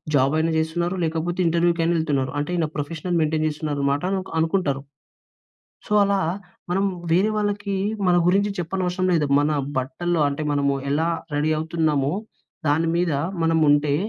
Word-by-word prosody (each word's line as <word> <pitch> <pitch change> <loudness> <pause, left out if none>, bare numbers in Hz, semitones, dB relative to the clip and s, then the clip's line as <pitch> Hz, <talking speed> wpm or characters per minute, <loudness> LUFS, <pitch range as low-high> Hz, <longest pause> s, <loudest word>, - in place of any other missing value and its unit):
Job 135 +1 +3
అయిన 160 +1 +1
జేస్తున్నారు, 170 +3 -1
లేకపోతే 165 +3 -2
ఇంటర్వ్యూకైనా 170 0 +2
యేళ్తున్నారు. 145 -5 0
అంటే 145 - -3
ఈయన 160 -2 +1
ప్రొఫెషనల్ 160 +4 -3
మెయింటెయిన్ 155 0 +1
జేస్తున్నారు 150 -1 -3
అనమాట 140 +3 +1 0.4
అనుకుంటారు. 160 -5 0 1.1
సో, - - -5
అలా 200 -1 +1 0.5
మనం 195 +2 +1 0.3
వేరే 195 +5 +3
వాళ్ళకి, 205 -1 -1 0.3
మన 175 - +4
గురించి 200 +3 +2
చెప్పనవసరం 185 +1 -1
లేదు. 150 -4 +1
మన 145 - +1 0.3
బట్టల్లో 165 +6 -1
అంటే 145 +2 -3
మనము 140 -1 +1 0.2
ఎలా 160 +3 +1 0.3
రెడీ 155 +2 +1
అవుతున్నామో, 155 -3 0 0.6
దాని 165 +3 +2
మీద 175 -3 +1 0.3
మనం 165 0 +2
ఉంటే, 145 0 +3
160 Hz, 140 wpm, -23 LUFS, 145-175 Hz, 1.1 s, మన